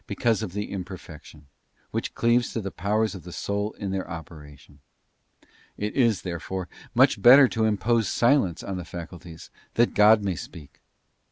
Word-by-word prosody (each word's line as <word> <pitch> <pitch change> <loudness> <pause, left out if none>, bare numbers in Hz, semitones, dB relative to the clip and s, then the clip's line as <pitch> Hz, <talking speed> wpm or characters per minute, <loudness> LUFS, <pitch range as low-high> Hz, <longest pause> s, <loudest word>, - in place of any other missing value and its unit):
215 120 - -1
because 110 - 0
of 100 -5 -5
the 105 +1 -4
imperfection, 85 -5 -9 0.5
which - - -4
cleaves 120 +1 +2
to - - -3
the 100 -3 -5
powers 105 +5 -1
of 95 - -8
cuap. - - -23
the 90 - -9
soul 100 +4 -3
in 100 -2 -5
their 95 -1 -4
operation. 75 -3 -11 1.0
It 105 +1 -3
is, 115 -6 +2
therefore, 90 +1 -5 0.3
much - - +4
better 130 +3 +8
to 110 -1 0
impose 110 +1 +1
silence 120 - +2
on 95 -1 -4
the 90 - -5
faculties, 85 -1 -10 0.2
that 120 +1 +2
God 105 +1 +5
may 95 -2 -1
speak. 75 -4 -11
100 Hz, 170 wpm, -25 LUFS, 85-110 Hz, 1.0 s, better